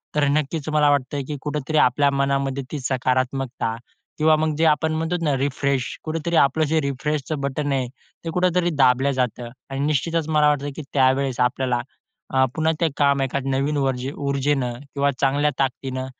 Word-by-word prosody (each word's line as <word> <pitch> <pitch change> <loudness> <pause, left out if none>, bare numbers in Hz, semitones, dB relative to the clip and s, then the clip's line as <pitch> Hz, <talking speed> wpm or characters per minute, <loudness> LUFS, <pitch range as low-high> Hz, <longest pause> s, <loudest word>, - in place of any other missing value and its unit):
तर 150 - +2
नक्कीच 150 +1 -1
मला 150 -1 +3
वाटतं, 140 0 0
की 150 -1 -4
कुठेतरी 150 +1 -2
आपल्या 140 0 +4
मनामध्ये 140 0 0
ती 150 - -3
सकारात्मकता 130 -2 -1 0.4
किंवा 155 0 +4
मग 155 0 0
जे 165 - +2
आपण 155 0 +2
म्हणतो 165 +2 -1
ना 145 -2 +2
रिफ्रेश, 140 -1 0 0.2
कुठेतरी 165 +1 -2
आपलं 140 +3 +3
जे 160 - +3
रिफ्रेशच 140 +2 -2
बटन 140 +1 -2
आहे 130 -2 0 0.4
ते - - -2
कुठेतरी 180 0 +1
दाबलं 135 0 +4
जातं. 125 -2 -2 0.2
आणि 135 0 -4
निश्चितच 155 +2 0
मला 150 -1 +4
वाटतं 145 -1 0
की 155 - -5
त्यावेळेस 130 -1 +2
आपल्याला 125 -1 +1 0.5
अ, 130 0 +4
पुन्हा 160 0 +2
ते 165 - +3
काम 140 -1 +3
एका 135 +1 -1
नवीन 135 +2 0
वर्जी 135 -1 -1
ऊर्जेनं 140 -2 0 0.2
किंवा 140 0 +2
चांगल्या 145 +2 +2
ताकदीनं 130 0 -2
140 Hz, 165 wpm, -22 LUFS, 130-150 Hz, 0.5 s, आपल्या